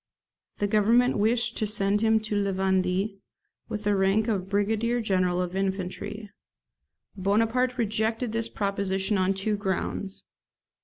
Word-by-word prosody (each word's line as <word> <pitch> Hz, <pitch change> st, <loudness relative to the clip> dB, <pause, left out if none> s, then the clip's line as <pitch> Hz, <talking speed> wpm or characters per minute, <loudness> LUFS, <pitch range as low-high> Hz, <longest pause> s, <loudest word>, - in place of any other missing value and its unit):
The 205 Hz, -, 0 dB
Government 220 Hz, +4 st, +3 dB
wished 230 Hz, +2 st, +2 dB
to 215 Hz, -, 0 dB
send 205 Hz, 0 st, +1 dB
him 220 Hz, 0 st, +4 dB
to 215 Hz, -1 st, -3 dB
La 200 Hz, -1 st, +1 dB
Vendee, 190 Hz, +1 st, 0 dB, 0.5 s
with 215 Hz, -2 st, -4 dB
the 205 Hz, -1 st, +2 dB
rank 195 Hz, +3 st, +2 dB
of 195 Hz, -4 st, -1 dB
brigadier 220 Hz, +4 st, +1 dB
general 185 Hz, -5 st, +1 dB
of 180 Hz, 0 st, -2 dB
infantry. 195 Hz, +2 st, -3 dB, 0.9 s
Bonaparte 225 Hz, +6 st, +1 dB
rejected 225 Hz, +1 st, -1 dB
this 230 Hz, 0 st, -2 dB
proposition 200 Hz, 0 st, -1 dB
on 185 Hz, +1 st, +1 dB
two 210 Hz, +2 st, 0 dB
grounds. 195 Hz, 0 st, -3 dB
205 Hz, 135 wpm, -26 LUFS, 195-220 Hz, 0.9 s, him